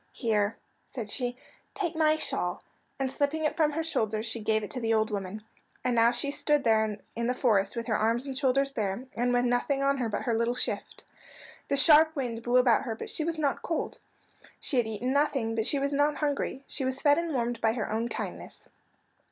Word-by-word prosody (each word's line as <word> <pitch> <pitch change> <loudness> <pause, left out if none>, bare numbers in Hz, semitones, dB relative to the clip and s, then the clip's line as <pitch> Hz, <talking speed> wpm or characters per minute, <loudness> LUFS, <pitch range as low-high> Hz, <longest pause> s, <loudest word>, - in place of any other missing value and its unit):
"Here," 215 -3 0 0.3
said 225 -5 -6
she, 245 +1 -2 0.4
"take 355 -5 -2
my 310 -1 +3
shawl"; 315 - -2 0.3
and 265 -1 -1
slipping 295 +3 0
it 305 - 0
from 305 -3 +2
her 325 +2 -1
shoulders 220 -8 -1
she 230 0 -2
gave 220 0 0
it 210 - -6
to 255 - -3
the 225 -1 +1
old 220 0 +1
woman. 200 +1 -4 0.4
And 250 - +2
now 230 0 +5
she 280 +4 -1
stood 295 0 +1
there 220 -2 +2 0.2
in 235 0 -1
the 250 - 0
forest 215 -6 +2
with 235 -1 -3
her 220 - 0
arms 230 +4 +1
and 270 -2 -5
shoulders 275 0 +1
bare, 215 0 -3
and 245 +1 +1
with 245 0 +2
nothing 260 +3 +1
on 275 0 +2
her 240 -3 -1
but 205 - -3
her 235 - 0
little 235 +2 +1
shift. - - -2 0.6
The 280 - +1
sharp 315 +2 +6
wind 240 -5 -3
blew 240 +1 +2
about 250 -2 +4
her, 230 -4 -4
but - - -5
she 315 - -2
was 330 +1 -2
not 290 -3 0
cold. 330 - -3 0.6
She 270 - -1
had 240 -2 +2
eaten 230 +4 -2
nothing, 275 -6 +1
but 225 -1 0
she 285 - +2
was 280 +1 -1
not 290 +1 +2
hungry. 285 -2 -2
She - - -3
was 260 +1 0
fed 290 +2 +4
and 335 -1 -3
warmed 240 -4 -1
by 225 0 +3
her 215 -3 -3
own 225 +2 0
kindness. - - -7
245 Hz, 220 wpm, -28 LUFS, 225-280 Hz, 0.6 s, sharp